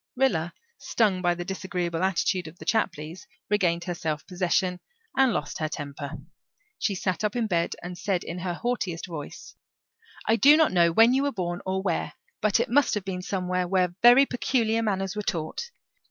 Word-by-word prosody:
Rilla, 180 Hz, -11 st, +1 dB, 0.2 s
stung 205 Hz, -5 st, +1 dB
by 175 Hz, -1 st, +2 dB
the 175 Hz, 0 st, -5 dB
disagreeable 180 Hz, -3 st, -3 dB
attitude 185 Hz, -1 st, 0 dB
of 160 Hz, +3 st, -12 dB
the -, -, -11 dB
Chapleys, 175 Hz, -, -2 dB, 0.2 s
regained 175 Hz, -4 st, +2 dB
her 175 Hz, 0 st, -3 dB
self 155 Hz, -3 st, -3 dB
possession 180 Hz, 0 st, 0 dB, 0.4 s
and 265 Hz, -1 st, +4 dB
lost 180 Hz, -, -3 dB
her 155 Hz, -1 st, -1 dB
temper. 145 Hz, -1 st, -6 dB, 0.7 s
She 205 Hz, -, 0 dB
sat 185 Hz, +1 st, -2 dB
up 210 Hz, +1 st, 0 dB
in 240 Hz, -2 st, +1 dB
bed 170 Hz, -5 st, 0 dB
and 175 Hz, +1 st, -6 dB
said 185 Hz, 0 st, -1 dB
in 170 Hz, +2 st, -6 dB
her 175 Hz, -1 st, -3 dB
haughtiest 205 Hz, -7 st, -2 dB
voice, 160 Hz, -5 st, -8 dB, 0.7 s
"I 225 Hz, -, +3 dB
do 290 Hz, +5 st, +7 dB
not 320 Hz, -1 st, +4 dB
know 170 Hz, -2 st, +4 dB
when 225 Hz, +7 st, +6 dB
you 265 Hz, -, +3 dB
were 285 Hz, 0 st, 0 dB
born, 175 Hz, -5 st, -3 dB
or 190 Hz, 0 st, -1 dB
where, 175 Hz, -4 st, -1 dB, 0.3 s
but 215 Hz, +1 st, +3 dB
it 235 Hz, -, +1 dB
must 285 Hz, -1 st, +3 dB
have 205 Hz, -2 st, -3 dB
been 185 Hz, -2 st, -4 dB
somewhere 180 Hz, -1 st, -1 dB
where 180 Hz, -1 st, +1 dB
very 245 Hz, +4 st, +8 dB
peculiar 230 Hz, -3 st, 0 dB
manners 195 Hz, -3 st, -1 dB
were 210 Hz, -, -2 dB
taught. 170 Hz, -, -3 dB
185 Hz, 185 wpm, -26 LUFS, 175-220 Hz, 0.7 s, very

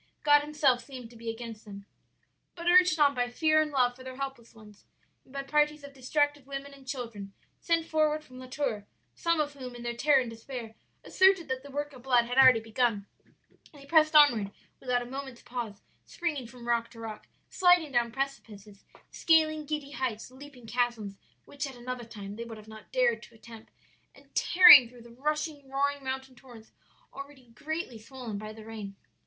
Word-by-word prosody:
God 290 Hz, -1 st, +6 dB
Himself 290 Hz, -4 st, +1 dB
seemed 250 Hz, -4 st, -10 dB
to -, -, -16 dB
be 230 Hz, 0 st, -7 dB
against 225 Hz, -1 st, -7 dB
them. 200 Hz, -1 st, -11 dB, 0.7 s
"But 340 Hz, -1 st, -8 dB
urged 360 Hz, -2 st, +5 dB
on 285 Hz, -1 st, +5 dB
by 245 Hz, -2 st, -1 dB
fear 310 Hz, +5 st, +3 dB
and 310 Hz, -, -1 dB
love 250 Hz, -4 st, +1 dB
for 255 Hz, -, -13 dB
their 260 Hz, 0 st, -8 dB
helpless 265 Hz, -4 st, -7 dB
ones, 210 Hz, -2 st, -16 dB, 0.4 s
and -, -, -23 dB
by 275 Hz, 0 st, -5 dB
parties 300 Hz, +1 st, +1 dB
of 285 Hz, 0 st, -11 dB
distracted 290 Hz, +1 st, -1 dB
women 280 Hz, 0 st, -7 dB
and 270 Hz, -1 st, -17 dB
children 230 Hz, -7 st, -6 dB, 0.3 s
sent 335 Hz, -1 st, 0 dB
forward 310 Hz, -1 st, +1 dB
from 255 Hz, -3 st, -14 dB
La 255 Hz, -, -10 dB
Tour 250 Hz, -6 st, -3 dB, 0.3 s
some 335 Hz, -1 st, 0 dB
of 295 Hz, -1 st, -1 dB
whom, 255 Hz, -3 st, -9 dB
in 240 Hz, -, -9 dB
their 240 Hz, 0 st, -3 dB
terror 280 Hz, +3 st, +4 dB
and 250 Hz, -3 st, -3 dB
despair, 230 Hz, 0 st, -8 dB, 0.3 s
asserted 380 Hz, -3 st, +3 dB
that 260 Hz, 0 st, -2 dB
the 285 Hz, -, -12 dB
work 290 Hz, +1 st, -4 dB
of 255 Hz, -, -13 dB
blood 245 Hz, -2 st, +3 dB
had 245 Hz, +2 st, 0 dB
already 260 Hz, -3 st, +8 dB
begun 225 Hz, -2 st, -1 dB, 0.7 s
they 280 Hz, -2 st, -14 dB
pressed 310 Hz, +1 st, +3 dB
onward 240 Hz, -9 st, +6 dB, 0.3 s
without 250 Hz, -2 st, -1 dB
a -, -, -10 dB
moment's 265 Hz, -1 st, -8 dB
pause, 235 Hz, -5 st, -6 dB, 0.2 s
springing 295 Hz, -8 st, -3 dB
from 240 Hz, 0 st, -12 dB
rock 235 Hz, -1 st, 0 dB
to 230 Hz, -, -15 dB
rock, 220 Hz, -2 st, -8 dB, 0.2 s
sliding 355 Hz, -5 st, +4 dB
down 240 Hz, -2 st, +1 dB
precipices, 215 Hz, -6 st, -6 dB, 0.3 s
scaling 310 Hz, -2 st, +2 dB
giddy 300 Hz, -2 st, -4 dB
heights, 250 Hz, -3 st, -4 dB
leaping 260 Hz, -2 st, -13 dB
chasms 225 Hz, -4 st, -2 dB, 0.3 s
which 285 Hz, 0 st, -5 dB
at 265 Hz, -, -10 dB
another 245 Hz, 0 st, -6 dB
time 205 Hz, -2 st, -9 dB
they 230 Hz, -, -5 dB
would 230 Hz, -1 st, -9 dB
not 220 Hz, 0 st, -11 dB
have -, -, -38 dB
dared -, -, +2 dB
to 235 Hz, -, -15 dB
attempt, 225 Hz, 0 st, -14 dB, 0.4 s
and -, -, -21 dB
tearing 315 Hz, -9 st, +8 dB
through 245 Hz, -1 st, -15 dB
the 235 Hz, -, -15 dB
rushing, 295 Hz, +2 st, -3 dB
roaring 280 Hz, +1 st, -1 dB
mountain 265 Hz, 0 st, -5 dB
torrents 240 Hz, -3 st, -15 dB, 0.4 s
already 275 Hz, -3 st, -11 dB
greatly 290 Hz, -1 st, -5 dB
swollen 230 Hz, -2 st, -7 dB
by 215 Hz, 0 st, -7 dB
the 215 Hz, 0 st, -12 dB
rain. 215 Hz, -3 st, -8 dB
260 Hz, 190 wpm, -29 LUFS, 235-290 Hz, 0.7 s, already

